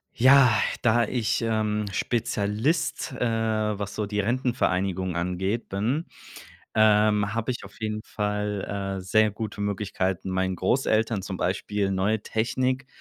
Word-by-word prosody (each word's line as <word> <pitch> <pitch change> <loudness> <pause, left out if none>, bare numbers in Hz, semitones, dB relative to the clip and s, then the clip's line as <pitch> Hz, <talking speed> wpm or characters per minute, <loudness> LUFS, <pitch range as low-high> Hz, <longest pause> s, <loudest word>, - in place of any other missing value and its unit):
Ja, 130 0 +7 0.3
da 120 0 +4
ich, 115 -1 0
ähm, 110 -2 0
Spezialist, 110 - -1
äh, - - -8
was 110 -3 -1
so 105 - -2
die 105 0 -1
Rentenvereinigung 95 -6 0
angeht, 95 +6 -2
bin, 120 - -1 0.7
ähm, 105 -1 +4
habe 115 +1 -1
ich - - -7
auf - - -14
jeden 110 0 -3
Fall, 105 -1 -3
äh, - - -5
sehr 110 +4 +3
gute 105 0 -5
Möglichkeiten, 95 -2 -2
meinen 95 0 0
Großeltern 110 +1 +1
zum 95 -1 -5
Beispiel 100 +2 -1
neue 100 +3 0
Technik, 130 +5 -1
105 Hz, 130 wpm, -26 LUFS, 100-115 Hz, 0.7 s, Ja